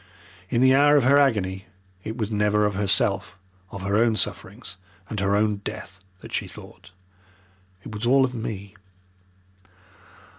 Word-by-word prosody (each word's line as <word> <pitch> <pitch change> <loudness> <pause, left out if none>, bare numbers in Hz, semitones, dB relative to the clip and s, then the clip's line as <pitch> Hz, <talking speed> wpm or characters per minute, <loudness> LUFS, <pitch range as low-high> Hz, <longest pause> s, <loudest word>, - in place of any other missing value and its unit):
In 120 - +1
the 130 0 +5
hour 145 +2 +5
of 140 - +3
her 140 +3 +5
agony 100 -8 0 0.4
it 110 +2 -6
was 110 -2 -3
never 105 0 +2
of 105 - 0
herself, 95 -1 0 0.3
of 100 0 -8
her 100 +1 0
own 115 0 +3
sufferings 105 0 -3 0.3
and 110 - -3
her 100 0 +1
own 105 0 +1
death 100 -1 -8 0.2
that - - -12
she - - -2
thought. - - -13 0.9
It - - -9
was 110 +3 -3
all 135 +1 +5
of 130 - -5
me. 100 -4 -6
105 Hz, 155 wpm, -24 LUFS, 100-120 Hz, 0.9 s, the